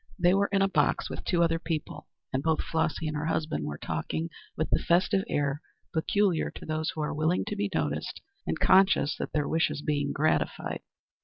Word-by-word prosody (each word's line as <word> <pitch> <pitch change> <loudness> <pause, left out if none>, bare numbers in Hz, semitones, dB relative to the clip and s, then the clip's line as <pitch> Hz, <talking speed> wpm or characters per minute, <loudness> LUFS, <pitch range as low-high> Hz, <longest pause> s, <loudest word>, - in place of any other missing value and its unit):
They 175 -1 +4
were 200 +1 +3
in 195 -1 +3
a - - +4
box 195 - +1
with - - -5
two 170 -2 +3
other 165 0 +2
people, 165 -2 -4 0.3
and 130 - +1
both 160 +1 +1
Flossy 160 0 -1
and 155 - -2
her 150 +1 -2
husband 155 - -1
were 75 0 -4
talking 165 - -3 0.3
with 160 - -1
the - - +3
festive 185 +3 +3
air 145 0 0 0.3
peculiar 180 +1 +2
to - - -8
those 155 0 -1
who 155 - -3
are 150 - -1
willing 155 +4 +1
to 210 - -3
be 205 -1 -1
noticed - - -2 0.3
and - - -1
conscious 190 -6 +5
that - - -4
their 150 -2 0
wish 160 0 +2
is 145 - -5
being 145 -1 0
gratified. 155 +2 0
160 Hz, 205 wpm, -28 LUFS, 150-180 Hz, 0.3 s, conscious